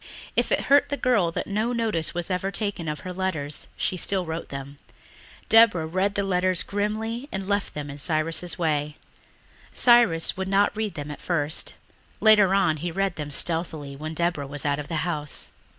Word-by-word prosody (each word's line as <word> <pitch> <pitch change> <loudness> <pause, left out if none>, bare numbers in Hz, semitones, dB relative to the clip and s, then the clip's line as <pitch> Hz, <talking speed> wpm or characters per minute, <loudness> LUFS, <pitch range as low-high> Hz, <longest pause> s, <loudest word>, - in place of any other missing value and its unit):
If - - +1
it - - +3
hurt 285 +1 +4
the 285 - -2
girl 210 -11 +2
that - - -3
no 215 +4 -1
notice 220 -9 0
was 175 +2 -4
ever 185 +1 -1
taken 200 -5 -3
of 150 0 -3
her 185 - -6
letters 160 -6 -2
she - - -1
still 185 0 +1
wrote 160 +1 -5
them. 140 +1 -8 0.7
Deborah 220 -8 +6
read 190 +5 0
the 200 - 0
letters 185 -1 +1
grimly 220 +6 -3
and 195 0 -3
then 190 - -9
left 200 0 -1
them 145 -1 -5
in 140 - -9
Cyrus's 165 +3 0
way. 150 -3 -1 0.8
Cyrus 235 -10 +5
would 190 0 -3
not 200 +2 +2
read 215 -4 -3
them 150 -1 -5
at 145 - -9
first; 155 -3 -1 0.4
later 210 -3 +6
on 175 -6 +2
he 175 +4 -3
read 195 +2 -1
them 150 -2 -5
stealthily 155 -2 -1
when 155 +3 -6
Deborah 170 -4 -1
was 145 0 -5
out 145 0 +1
of 145 - -6
the 165 0 -2
house. 150 -4 -4
175 Hz, 190 wpm, -25 LUFS, 155-200 Hz, 0.8 s, Deborah